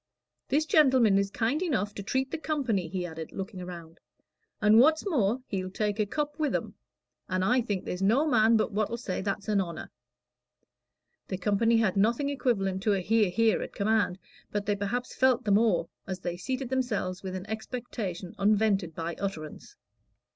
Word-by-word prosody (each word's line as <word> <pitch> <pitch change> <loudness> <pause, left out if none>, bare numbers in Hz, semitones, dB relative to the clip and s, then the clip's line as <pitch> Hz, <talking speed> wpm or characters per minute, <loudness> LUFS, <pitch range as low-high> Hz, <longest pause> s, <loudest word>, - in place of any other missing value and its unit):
"This 305 +3 +2
gentleman 260 -10 +5
is 200 0 0
kind 235 - -1
enough 255 - -1
to - - -6
treat 260 +6 -1
the 325 - -3
company," 260 - -1
he 180 +1 -3
added, 160 -2 -7
looking 190 -1 -6
round, 170 -2 -9 0.6
"and 215 +1 +6
what's 315 - +4
more, 250 - +1
he'll 185 -5 -3
take 210 +2 -2
a 210 - +1
cup 295 +5 -3
with 300 -2 +1
'em; - - -3 0.6
and 185 -1 0
I 250 +4 +3
think 205 -5 -3
there's 180 - -4
no 230 +10 +3
man 230 -5 +4
but 215 - 0
what'll 215 +3 -1
say 215 -6 -3
that's 200 +1 -3
a 210 - +1
honor." 170 -4 -4 1.4
The 185 - -3
company 210 +5 +2
had 215 -4 +1
nothing 235 +8 +2
equivalent 195 -9 0
to 210 +1 +2
a 195 - +1
"hear, 210 +2 +2
hear," 220 +5 +2
at - - -7
command, 205 -3 +1 0.3
but 205 -1 -2
they 205 - +1
perhaps 205 +5 -3
felt 260 -1 +3
the 205 - +1
more, 200 -5 +3 0.2
as 190 -1 -5
they 175 -1 -3
seated 255 +7 -4
themselves 220 -8 -1
with 190 -1 -5
an 185 +2 -6
expectation 220 -5 -5
unvented 200 -4 +2
by 165 0 -3
utterance. 160 -6 -6
210 Hz, 180 wpm, -28 LUFS, 190-245 Hz, 1.4 s, and